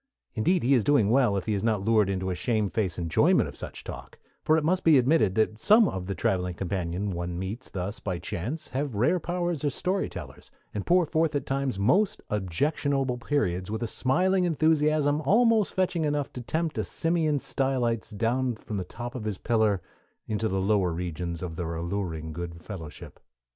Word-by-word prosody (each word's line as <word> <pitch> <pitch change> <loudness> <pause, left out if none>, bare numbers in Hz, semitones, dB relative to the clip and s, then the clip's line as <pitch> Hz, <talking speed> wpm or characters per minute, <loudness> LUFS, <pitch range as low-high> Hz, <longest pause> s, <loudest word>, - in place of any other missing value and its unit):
Indeed 175 +11 +1
he 130 +4 +4
is 120 -5 +4
doing 110 -5 +3
well 120 -6 +3
if 95 - -3
he 110 - 0
is 100 - -1
not 110 -4 0
lured 110 -3 +3
into 95 -1 -1
a - - 0
shamefaced 105 0 -1
enjoyment 85 -2 +3
of - - -9
such - - -7
talk; - - -9 0.3
for 155 - +4
it 160 - 0
must 180 +4 +1
be 160 -3 +6
admitted 125 - +3
that 110 0 +1
some 215 0 +6
of 95 - -4
the 100 - -3
traveling 90 -1 0
companions 95 +1 -2
one 85 0 -4
meets 100 +7 -5
thus 95 +3 -4
by 90 -3 -3
chance 120 - -5
have 135 -1 -3
rare 125 - +2
powers 175 -2 -2
as 145 -3 0
story 190 +2 -1
tellers, - - -9 0.2
and 105 - -4
pour 180 0 +4
forth 160 0 0
at 145 - -1
times 135 -4 -1
most 180 - +2
objectionable 130 - 0
periods 95 -10 -1
with 110 +2 -3
a - - -1
smiling 180 - +1
enthusiasm 155 -2 +2
almost 220 - +3
fetching 180 -3 +1
enough 145 -2 -1
to 125 - -6
tempt 160 +5 -2
a - - +1
Simeon 165 -3 0
Stylites 130 -5 -1
down 120 +4 0
from 110 -1 -6
the 95 - -2
top 120 +6 -7
of 120 -4 -6
his 105 -3 -2
pillar 110 -5 +1 0.4
into 110 +1 -1
the 95 -2 -1
lower 95 -2 +2
regions 85 0 -4
of 85 -3 -5
their 85 -1 -3
alluring 85 -2 -3
good 85 0 -6
fellowship. 80 -4 -9
115 Hz, 190 wpm, -27 LUFS, 95-150 Hz, 0.4 s, be